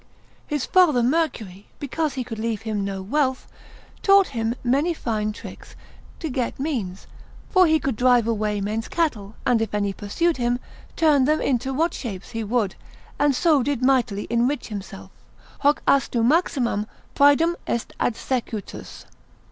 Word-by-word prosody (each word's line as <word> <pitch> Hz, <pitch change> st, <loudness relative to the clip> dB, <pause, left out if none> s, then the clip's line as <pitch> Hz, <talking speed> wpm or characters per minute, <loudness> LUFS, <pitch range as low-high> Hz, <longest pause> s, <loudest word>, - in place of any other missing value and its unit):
His 295 Hz, -4 st, -1 dB
father 315 Hz, -10 st, +4 dB
Mercury, 240 Hz, -, -1 dB
because 295 Hz, 0 st, -2 dB
he 260 Hz, -, -2 dB
could 225 Hz, -2 st, -7 dB
leave 225 Hz, -1 st, -2 dB
him 215 Hz, -3 st, -2 dB
no 195 Hz, -1 st, -4 dB
wealth, 260 Hz, +4 st, 0 dB, 0.5 s
taught 395 Hz, -1 st, +5 dB
him 230 Hz, -3 st, -2 dB
many 280 Hz, +8 st, +1 dB
fine 215 Hz, -6 st, -2 dB
tricks 210 Hz, -, -11 dB, 0.4 s
to 325 Hz, -, -3 dB
get 255 Hz, -4 st, -3 dB
means, 230 Hz, -11 st, -3 dB, 0.5 s
for 370 Hz, -2 st, +5 dB
he 315 Hz, 0 st, +3 dB
could 270 Hz, -7 st, -2 dB
drive 245 Hz, -2 st, +4 dB
away 210 Hz, -2 st, -1 dB
men's 215 Hz, +3 st, -2 dB
cattle, 225 Hz, -11 st, -2 dB
and 235 Hz, -2 st, +3 dB
if 220 Hz, -2 st, -2 dB
any 205 Hz, -1 st, 0 dB
pursued 305 Hz, -, -1 dB
him, 245 Hz, -1 st, +1 dB, 0.4 s
turn 295 Hz, -5 st, +4 dB
them 305 Hz, +2 st, +2 dB
into 260 Hz, 0 st, 0 dB
what 320 Hz, +5 st, 0 dB
shapes 200 Hz, -6 st, -6 dB
he 225 Hz, -1 st, -3 dB
would, 215 Hz, -2 st, 0 dB, 0.5 s
and 290 Hz, -1 st, +3 dB
so 310 Hz, -1 st, +3 dB
did 270 Hz, -1 st, -1 dB
mightily 245 Hz, -6 st, +2 dB
enrich 240 Hz, +5 st, 0 dB
himself, 195 Hz, -2 st, -8 dB, 0.5 s
hoc 290 Hz, +1 st, +2 dB
astu 245 Hz, -4 st, +2 dB
maximam 250 Hz, -, +1 dB, 0.3 s
praedam 285 Hz, +4 st, +4 dB
est 235 Hz, -, -2 dB
adsecutus. 230 Hz, -3 st, -3 dB
245 Hz, 150 wpm, -23 LUFS, 215-290 Hz, 0.5 s, taught